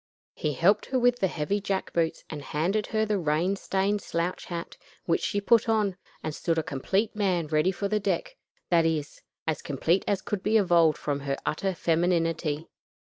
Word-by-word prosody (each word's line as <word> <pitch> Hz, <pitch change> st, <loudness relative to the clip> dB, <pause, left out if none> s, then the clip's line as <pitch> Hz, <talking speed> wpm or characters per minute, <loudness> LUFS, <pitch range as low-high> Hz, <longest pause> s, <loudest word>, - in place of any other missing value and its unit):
He 150 Hz, -, -2 dB
helped 195 Hz, +9 st, +3 dB
her 265 Hz, -, 0 dB
with 245 Hz, 0 st, +3 dB
the 190 Hz, -, +3 dB
heavy 175 Hz, +5 st, -1 dB
jack 195 Hz, -1 st, -2 dB
boots 165 Hz, -1 st, 0 dB
and 150 Hz, -2 st, -6 dB
handed 175 Hz, +10 st, -1 dB
her 220 Hz, -1 st, +1 dB
the 210 Hz, -2 st, 0 dB
rain 165 Hz, +4 st, +1 dB
stained 195 Hz, +1 st, 0 dB
slouch 170 Hz, +1 st, -2 dB
hat 170 Hz, -2 st, -6 dB, 0.3 s
which 165 Hz, -, +1 dB
she 205 Hz, -, 0 dB
put 225 Hz, +2 st, +3 dB
on, 210 Hz, -4 st, +2 dB, 0.3 s
and 155 Hz, -, -3 dB
stood 165 Hz, +2 st, -1 dB
a 160 Hz, -, +1 dB
complete 195 Hz, +12 st, -1 dB
man 185 Hz, -5 st, +1 dB
ready 155 Hz, +4 st, +2 dB
for 200 Hz, +2 st, -2 dB
the 210 Hz, +1 st, +1 dB
deck -, -, -2 dB, 0.4 s
that 170 Hz, -1 st, +5 dB
is, 160 Hz, -3 st, -2 dB, 0.2 s
as 160 Hz, -3 st, -1 dB
complete 165 Hz, +6 st, +1 dB
as 195 Hz, -2 st, 0 dB
could 205 Hz, -3 st, -3 dB
be 215 Hz, +3 st, +3 dB
evolved 170 Hz, -6 st, +4 dB
from 145 Hz, -1 st, -2 dB
her 140 Hz, 0 st, -2 dB
utter 190 Hz, +4 st, -1 dB
femininity. 165 Hz, -2 st, 0 dB
175 Hz, 190 wpm, -27 LUFS, 160-205 Hz, 0.4 s, that